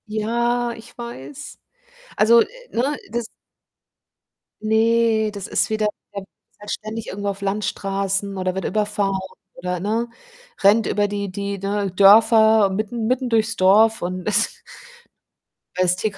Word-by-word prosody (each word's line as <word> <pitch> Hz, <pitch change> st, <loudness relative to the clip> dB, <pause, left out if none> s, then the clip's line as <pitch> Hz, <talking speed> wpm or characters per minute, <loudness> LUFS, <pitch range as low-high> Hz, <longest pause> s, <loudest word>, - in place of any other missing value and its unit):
Ja, 235 Hz, +3 st, -1 dB
ich 225 Hz, -, -15 dB
weiß. 245 Hz, +4 st, -9 dB, 0.6 s
Also, 230 Hz, +2 st, +6 dB
äh, -, -, -5 dB, 0.2 s
ne, 270 Hz, +6 st, -1 dB
das 235 Hz, +1 st, -3 dB, 1.4 s
ne, 220 Hz, 0 st, +2 dB
das 200 Hz, -2 st, -6 dB
ist -, -, 0 dB
wieder 215 Hz, -1 st, +1 dB, 0.3 s
der 200 Hz, -, -4 dB, 0.4 s
fährt 205 Hz, 0 st, -11 dB
ständig 215 Hz, +1 st, -5 dB
irgendwo 200 Hz, +1 st, -4 dB
auf 200 Hz, 0 st, -6 dB
Landstraßen 195 Hz, -1 st, -2 dB
oder 185 Hz, 0 st, -1 dB
wird 190 Hz, -, -4 dB
überfahren 205 Hz, -2 st, 0 dB, 0.4 s
oder, 180 Hz, 0 st, -4 dB
ne, 220 Hz, +5 st, -1 dB, 0.5 s
rennt 210 Hz, +3 st, +5 dB
über 205 Hz, 0 st, +1 dB
die 200 Hz, -1 st, -4 dB
die, 200 Hz, +1 st, -4 dB
ne, 200 Hz, 0 st, -2 dB
Dörfer 220 Hz, +1 st, +6 dB
mitten 215 Hz, +3 st, -3 dB
mitten 255 Hz, +1 st, 0 dB
durchs 225 Hz, -1 st, +1 dB
Dorf 215 Hz, +3 st, +4 dB
und 180 Hz, +1 st, -4 dB
ist 210 Hz, +2 st, +1 dB, 1.2 s
als 180 Hz, -1 st, +3 dB
TK 195 Hz, +1 st, -3 dB
210 Hz, 135 wpm, -21 LUFS, 195-225 Hz, 1.4 s, Also